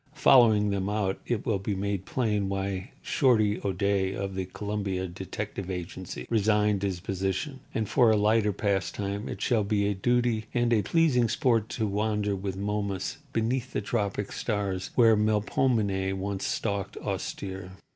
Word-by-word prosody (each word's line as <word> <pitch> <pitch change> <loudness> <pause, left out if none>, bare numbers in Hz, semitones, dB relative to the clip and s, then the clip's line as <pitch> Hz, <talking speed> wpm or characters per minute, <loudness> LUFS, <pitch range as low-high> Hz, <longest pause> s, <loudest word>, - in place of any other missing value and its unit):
Following 110 -8 +5
them 100 0 -1
out 105 -2 -1
it 120 -4 -1
will 105 -4 +1
be 100 +1 -2
made 100 -1 -2
plain 105 -6 0
why 95 -1 -3
"Shorty" 110 -6 +2
O'Day, 95 0 0
of 100 -1 -3
the 95 0 -2
Columbia 100 -1 -3
Detective 95 +2 -5
Agency, 90 0 -6
resigned 105 -2 +2
his 95 -3 -1
position. 95 - -2 0.2
And, 110 -2 0
for 120 0 +4
a 110 - +5
lighter 105 0 +3
pastime, 100 0 -2
it 100 - -5
shall 115 -4 +2
be 100 0 +1
a 100 - +1
duty 120 +1 +1
and 120 -1 +2
a 110 - +4
pleasing 125 - +3
sport 115 -3 +1
to 110 - +1
wander 105 0 0
with 95 0 -4
Momus 100 0 -2
beneath 125 +3 -1
the - - 0
tropic 100 -1 -2
stars 100 -4 -2
where 115 -2 +6
Melpomene 105 -2 +1
once 100 0 -3
stalked 100 -3 -2
austere. 95 -1 -5
100 Hz, 155 wpm, -28 LUFS, 95-110 Hz, 0.2 s, where